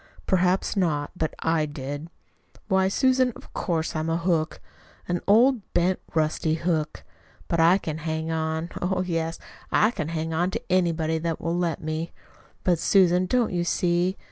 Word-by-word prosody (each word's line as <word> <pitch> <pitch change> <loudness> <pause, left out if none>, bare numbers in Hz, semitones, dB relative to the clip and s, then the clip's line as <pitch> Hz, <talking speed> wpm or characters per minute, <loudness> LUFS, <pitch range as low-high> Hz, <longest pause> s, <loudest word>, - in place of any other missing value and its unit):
"Perhaps 185 +2 +1
not; 155 -7 0
but 160 -3 -2
I 160 -2 +1
did. 145 +2 -6 0.6
Why, 190 0 +3
Susan, 255 +3 +2
of - - -14
course 165 -4 -2
I'm 155 +1 -1
a 165 - +1
hook 170 -2 0 0.5
an 175 0 -1
old, 235 +4 +5
bent, 180 +2 +2 0.2
rusty 155 0 +1
hook. 160 -2 -2 0.4
But 170 - 0
I 170 +3 +6
can 160 -5 -5
hang 160 0 -3
on 160 +1 -2
oh, 185 +1 0
yes, 165 -1 -2 0.3
I 215 - +4
can 155 - -4
hang 160 0 -3
on 175 +3 +1
to 225 0 -6
anybody 165 -3 +1
that 165 0 -2
will 165 +1 -2
let 170 -4 -1
me! 155 +2 -3 0.5
But, 175 -3 +2
Susan, 185 -1 +4
don't 240 -1 +1
you 175 -1 0
see? 175 +1 +1
170 Hz, 165 wpm, -25 LUFS, 160-185 Hz, 0.6 s, I